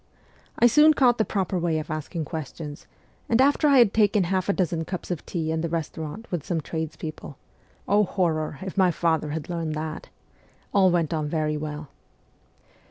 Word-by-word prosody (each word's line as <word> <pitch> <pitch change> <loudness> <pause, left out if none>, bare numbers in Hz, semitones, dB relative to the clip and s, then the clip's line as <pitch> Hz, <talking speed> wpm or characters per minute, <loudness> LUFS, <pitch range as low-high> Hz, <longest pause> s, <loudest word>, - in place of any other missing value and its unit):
I - - +4
soon 300 +6 +6
caught 245 -4 +4
the - - +4
proper 190 -2 -1
way 165 -2 0
of 155 +1 -5
asking 155 +1 -4
questions, 150 0 -7 0.4
and 230 - +3
after 285 +3 +4
I 280 -2 +5
had 235 -5 +5
taken 210 -2 +3
half 185 +2 -1
a - - +4
dozen 170 -3 -1
cups 180 +2 -6
of 175 - -3
tea 160 -3 -2
in 160 0 -1
the 170 - -2
restaurant 160 +4 -4
with 175 -5 -2
some 170 +1 -1
trades 160 0 -4
people 155 -3 -8 0.5
(oh, 205 +1 +4
horror, 160 -6 -1
if 190 +1 -4
my 185 -1 +5
father 160 -2 0
had 150 0 -4
learned 165 -3 -3
that!), 155 0 -5 0.6
all 195 -2 +5
went 170 -3 +1
on 155 -2 -1
very 155 -1 0
well. 150 -1 -5
170 Hz, 185 wpm, -25 LUFS, 155-195 Hz, 0.6 s, soon